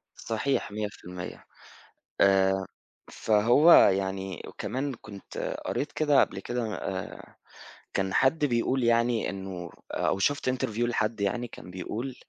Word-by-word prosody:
صحيح 115 +1 -2
100% 100 -4 -6 0.8
آآ 95 0 +4 0.5
فهو 120 +10 +5
يعني 95 - +3
وكمان 135 +1 -3
كنت 100 -2 -6
قريت 145 +1 -2
كده 150 -3 +3
قبل - - 0
كده 115 0 -3
آآ 95 -1 -6 0.6
كان 95 -1 -1
حد 145 +4 +3
بيقول 125 0 +1
يعني 115 0 +2
إنه 95 -3 -6 0.2
أو - - 0
شُفت 140 +5 +1
Interview 120 -3 -2
لحد 115 -2 -1
يعني 120 +5 -1
كان 90 - -11
بيقول، 115 +8 -5
110 Hz, 115 wpm, -28 LUFS, 95-125 Hz, 0.8 s, فهو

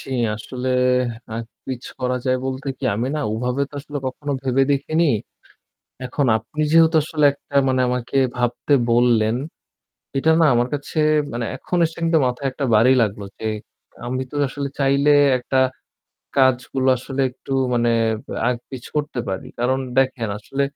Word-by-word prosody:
জি। - - -10 0.3
আসলে, 125 +4 -5 0.7
আগ-পিছ 120 +2 -7 0.2
করা 125 0 0
যায় 130 -1 +2
বলতে 135 +1 -4
কি - - -6
আমি 115 +5 -1
না - - -1
ওভাবে 125 +4 -1
তো - - -15
আসলে 145 0 -6
কখনো 145 +3 -4
ভেবে 135 0 +2
দেখিনি। 155 +4 +1 1.0
এখন 140 +2 -1
আপনি 115 +8 -6
যেহেতু 165 0 +6
আসলে 150 -1 +1
একটা 140 0 -14
মানে 130 -1 +2
আমাকে 125 +2 -2 0.2
ভাবতে 120 +4 0 0.2
বললেন, 115 -2 +3 0.8
এটা 160 +4 +3
না - - +6
আমার 120 +1 +2
কাছে 145 +2 -5 0.4
মানে 120 0 -2
এখন 180 - -3
এসে 160 - -5
কিন্তু 165 0 +3
মাথায় 125 +2 -2
একটা 140 +2 -3
বাড়ি 115 +4 +5
লাগলো, 105 -2 -1 0.2
যে - - -6 0.6
আমি 130 +2 -2
তো - - -9
আসলে 140 +2 -4
চাইলে 140 +1 +3 0.3
একটা 130 +1 -2 0.8
কাজগুলো 130 0 +2
আসলে 130 +2 -5
একটু 130 +2 -9 0.2
মানে 120 0 +2 0.6
আগ-পিছ 125 +1 -5
করতে 150 -4 -1
পারি। 95 -1 -4
কারণ 125 +2 +1 0.2
দেখেন 130 -4 +1
আসলে 135 +6 -3
130 Hz, 150 wpm, -21 LUFS, 120-140 Hz, 1.0 s, যেহেতু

